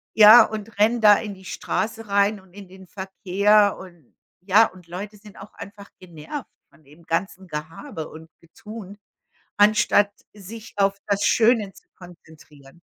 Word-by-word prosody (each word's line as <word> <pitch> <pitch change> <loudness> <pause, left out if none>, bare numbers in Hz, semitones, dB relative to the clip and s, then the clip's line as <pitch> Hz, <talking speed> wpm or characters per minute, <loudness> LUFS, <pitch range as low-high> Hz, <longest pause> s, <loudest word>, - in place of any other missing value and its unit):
ja, 220 +2 +9
und 215 -1 -9
rennt 225 +2 +2
da 205 -1 +8
in 210 -2 -7
die 190 -1 -16
Straße 225 +4 -4
rein 200 +1 +1
und 190 -1 -23
in 200 -2 -13
den 190 0 -15
Verkehr 200 +2 +1
und 175 -8 -16 0.3
ja, 205 +4 +4
und 180 -2 -18
Leute 200 +4 -8
sind 210 -1 -17
auch 195 - -13
einfach 200 0 -12
genervt 180 - -9 0.2
von - - -24
dem 150 +5 -20
ganzen 185 +3 -4
Gehabe 160 - -7
und 160 +1 -13
Getuhe 205 +4 -12 0.6
anstatt 205 0 +3 0.2
sich 215 +2 -12
auf 195 0 +1
das 200 -1 -1
Schöne 225 -3 +2
zu - - -20
konzentrieren. 160 -4 -17
200 Hz, 155 wpm, -22 LUFS, 180-210 Hz, 0.6 s, ja